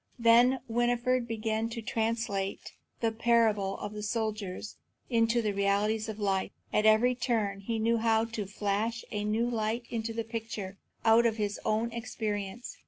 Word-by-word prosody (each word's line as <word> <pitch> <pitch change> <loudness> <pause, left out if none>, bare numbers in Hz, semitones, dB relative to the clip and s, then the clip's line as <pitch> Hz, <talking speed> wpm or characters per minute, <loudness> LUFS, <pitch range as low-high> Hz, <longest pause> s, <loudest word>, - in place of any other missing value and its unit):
Then 240 +2 +5
Winfried 240 +1 +1
began 225 0 -1
to 230 0 -5
translate 220 -3 -2 0.3
the 225 -1 +2
parable 220 -4 +2
of 205 - -6
the 210 - -5
soldier 215 -3 -2 0.5
into 230 0 +3
the 210 - +1
realities 205 +2 +1
of 215 - -5
life. 195 -2 0 0.2
At 210 +1 +3
every 220 +4 +5
turn 230 -5 -1
he 225 +3 -3
knew 230 +1 +2
how 225 0 +2
to 225 -3 -5
flash 210 +3 -2
a 210 -1 -2
new 220 +3 +1
light 230 0 -1
into 230 -1 -2
the 225 0 -2
picture 220 -4 -6 0.3
out 230 +1 +6
of 225 -1 -1
his 205 -1 -2
own 225 +2 0
experience. 220 -2 -4
225 Hz, 160 wpm, -30 LUFS, 210-230 Hz, 0.5 s, out